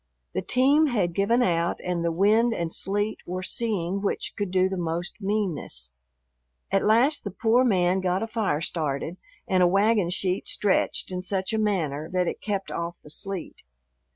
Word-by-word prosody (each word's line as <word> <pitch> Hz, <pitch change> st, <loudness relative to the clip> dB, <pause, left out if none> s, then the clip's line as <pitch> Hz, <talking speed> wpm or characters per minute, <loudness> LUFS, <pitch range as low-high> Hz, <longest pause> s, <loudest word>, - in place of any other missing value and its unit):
The -, -, -1 dB
team 280 Hz, +5 st, +4 dB
had 200 Hz, -10 st, 0 dB
given 230 Hz, +7 st, +2 dB
out 170 Hz, -3 st, +1 dB
and 175 Hz, -2 st, -1 dB
the 170 Hz, -, +1 dB
wind 215 Hz, +7 st, +3 dB
and 170 Hz, -1 st, -2 dB
sleet 205 Hz, +2 st, -1 dB
were 185 Hz, +1 st, -4 dB
seeing 195 Hz, -3 st, -1 dB
which 200 Hz, -, -2 dB
could 205 Hz, -2 st, -2 dB
do 185 Hz, 0 st, +3 dB
the 190 Hz, -, -3 dB
most 175 Hz, +3 st, -3 dB
meanness. 180 Hz, -, -2 dB, 0.8 s
At 195 Hz, -, +2 dB
last 240 Hz, +8 st, +3 dB
the 205 Hz, -, -3 dB
poor 225 Hz, +5 st, +2 dB
man 185 Hz, -5 st, +2 dB
got 185 Hz, +2 st, 0 dB
a -, -, -3 dB
fire 215 Hz, -9 st, -1 dB
started 160 Hz, 0 st, -2 dB, 0.3 s
and 185 Hz, -4 st, +2 dB
a 180 Hz, -, +6 dB
wagon 200 Hz, 0 st, +3 dB
sheet 185 Hz, +1 st, -1 dB
stretched 200 Hz, -1 st, 0 dB
in 180 Hz, 0 st, -3 dB
such 190 Hz, +2 st, -2 dB
a 220 Hz, -, +1 dB
manner 160 Hz, -7 st, -1 dB
that 180 Hz, -1 st, +1 dB
it -, -, -3 dB
kept 200 Hz, -2 st, -3 dB
off 170 Hz, 0 st, -4 dB
the 150 Hz, -, -10 dB
sleet. 195 Hz, +1 st, -5 dB
190 Hz, 180 wpm, -26 LUFS, 175-215 Hz, 0.8 s, a